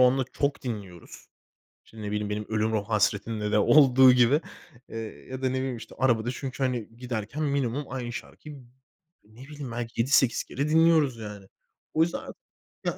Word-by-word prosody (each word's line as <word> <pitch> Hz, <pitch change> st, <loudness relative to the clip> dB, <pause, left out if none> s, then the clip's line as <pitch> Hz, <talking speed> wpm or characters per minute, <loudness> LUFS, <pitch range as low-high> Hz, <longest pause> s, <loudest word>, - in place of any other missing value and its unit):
onunla 130 Hz, +1 st, +4 dB
çok 140 Hz, 0 st, -1 dB
dinliyoruz. 100 Hz, -8 st, -7 dB, 0.6 s
İşte, 115 Hz, -, -18 dB
ne 105 Hz, 0 st, -4 dB
bileyim, 105 Hz, 0 st, -2 dB
benim 105 Hz, 0 st, -3 dB
Ölürüm 110 Hz, 0 st, 0 dB
Hasretinle 105 Hz, 0 st, 0 dB
de 105 Hz, -, +4 dB
olduğu 130 Hz, +1 st, +7 dB
gibi. 125 Hz, +5 st, +4 dB, 0.5 s
Eee, 115 Hz, -, -7 dB, 0.3 s
ya 130 Hz, 0 st, -6 dB
da 130 Hz, -, +1 dB
ne -, -, -3 dB
bileyim, 130 Hz, -2 st, -3 dB
işte, -, -, -11 dB
arabada 120 Hz, -2 st, +2 dB
çünkü, 135 Hz, +1 st, -5 dB
hani, 120 Hz, -3 st, -2 dB
giderken 120 Hz, +3 st, -4 dB
minimum 140 Hz, -1 st, -1 dB
aynı 125 Hz, -2 st, -5 dB
şarkıyı 145 Hz, +2 st, -9 dB, 0.6 s
ne 110 Hz, +4 st, -17 dB
bileyim, 145 Hz, -3 st, -8 dB
belki 115 Hz, -1 st, -2 dB
7-8 130 Hz, -1 st, +3 dB
kere 140 Hz, +3 st, -3 dB
dinliyoruz 160 Hz, -5 st, +4 dB
yani. 105 Hz, -3 st, -8 dB, 0.5 s
O 160 Hz, -, +4 dB
yüzden 170 Hz, -, -1 dB
ar -, -, -9 dB, 0.5 s
yani -, -, -1 dB
125 Hz, 165 wpm, -27 LUFS, 110-135 Hz, 0.6 s, olduğu